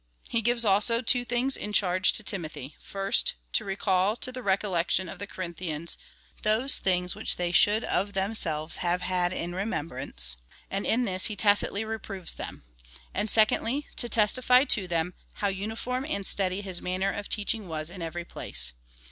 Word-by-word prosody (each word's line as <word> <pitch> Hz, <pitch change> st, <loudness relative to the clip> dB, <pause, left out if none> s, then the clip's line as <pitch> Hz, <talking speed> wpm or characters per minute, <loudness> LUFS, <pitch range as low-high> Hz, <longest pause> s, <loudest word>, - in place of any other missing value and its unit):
He 230 Hz, -, -1 dB
gives 235 Hz, +1 st, +4 dB
also 215 Hz, +4 st, +3 dB
two 245 Hz, +1 st, +4 dB
things 245 Hz, +2 st, 0 dB
in 210 Hz, -, -4 dB
charge 185 Hz, -2 st, +3 dB
to 215 Hz, -, 0 dB
Timothy 155 Hz, -, -4 dB
— -, -, -33 dB
first, 195 Hz, -, +2 dB, 0.2 s
to -, -, +2 dB
recall 195 Hz, +1 st, +1 dB
to 255 Hz, -, +1 dB
the 255 Hz, 0 st, -7 dB
recollection 190 Hz, -3 st, 0 dB
of 180 Hz, -, -9 dB
the 200 Hz, -, -6 dB
Corinthians 170 Hz, -3 st, -2 dB, 0.5 s
those 220 Hz, +6 st, +3 dB
things 180 Hz, -1 st, +1 dB
which -, -, 0 dB
they 175 Hz, -1 st, -1 dB
should 210 Hz, +4 st, +4 dB
of 200 Hz, +1 st, -1 dB
themselves 190 Hz, -6 st, 0 dB
have 180 Hz, +1 st, -1 dB
had 180 Hz, -1 st, 0 dB
in 175 Hz, -1 st, -4 dB
remem 180 Hz, -4 st, -3 dB
brance, 65 Hz, -, 0 dB, 0.3 s
and 195 Hz, +1 st, -2 dB
in 245 Hz, +2 st, +2 dB
this 185 Hz, -2 st, +1 dB
he 215 Hz, -, +1 dB
tacitly 205 Hz, 0 st, +2 dB
reproves 205 Hz, -5 st, -4 dB
them; -, -, -8 dB, 0.5 s
and 215 Hz, -, -1 dB
secondly, 230 Hz, +6 st, +2 dB
to 240 Hz, -, +2 dB
testify 250 Hz, +4 st, +4 dB
to 210 Hz, -9 st, +2 dB
them, 170 Hz, +1 st, -1 dB, 0.2 s
how 200 Hz, -, -1 dB
uniform 220 Hz, +6 st, -4 dB
and 200 Hz, -9 st, -2 dB
steady 190 Hz, 0 st, +1 dB
his 190 Hz, -3 st, -4 dB
manner 185 Hz, +2 st, -1 dB
of 205 Hz, 0 st, -6 dB
teaching 210 Hz, -1 st, 0 dB
was 155 Hz, 0 st, -3 dB
in 185 Hz, -1 st, -9 dB
every 170 Hz, +1 st, -5 dB
place. -, -, -1 dB
195 Hz, 175 wpm, -27 LUFS, 175-220 Hz, 0.5 s, gives